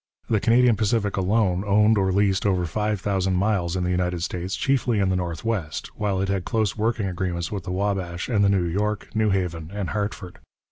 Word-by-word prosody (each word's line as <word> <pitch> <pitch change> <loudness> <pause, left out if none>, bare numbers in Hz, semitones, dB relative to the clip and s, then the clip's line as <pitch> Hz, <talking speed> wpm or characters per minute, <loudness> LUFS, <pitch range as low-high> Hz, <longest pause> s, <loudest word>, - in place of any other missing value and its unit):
The 110 - +3
Canadian 120 +1 +4
Pacific 105 -1 0
alone 95 -1 +1
owned 105 +2 +4
or 95 -2 +1
leased 100 +1 +2
over 90 -3 +1
five 105 +3 -1
thousand 95 -1 0
miles 95 -3 0
in 90 - -1
the 90 - 0
United 90 -1 -1
States, 90 +1 -3
chiefly 130 -4 +1
in 95 -1 +2
the 95 - +1
northwest, 90 -1 -3
while 100 -3 -1
it 95 - 0
had 95 -2 -1
close 110 -2 0
working 110 0 0
agreements 90 -2 -3
with 100 -2 -4
the 90 - -4
Wabash 95 -2 -2
and 105 -5 +2
the 100 - +4
New 95 -3 +2
York, 105 +4 -2
New 110 -1 +2
Haven 85 -5 -2
and 100 -2 -4
Hartford. 100 -3 -4
100 Hz, 200 wpm, -24 LUFS, 90-105 Hz, -, Canadian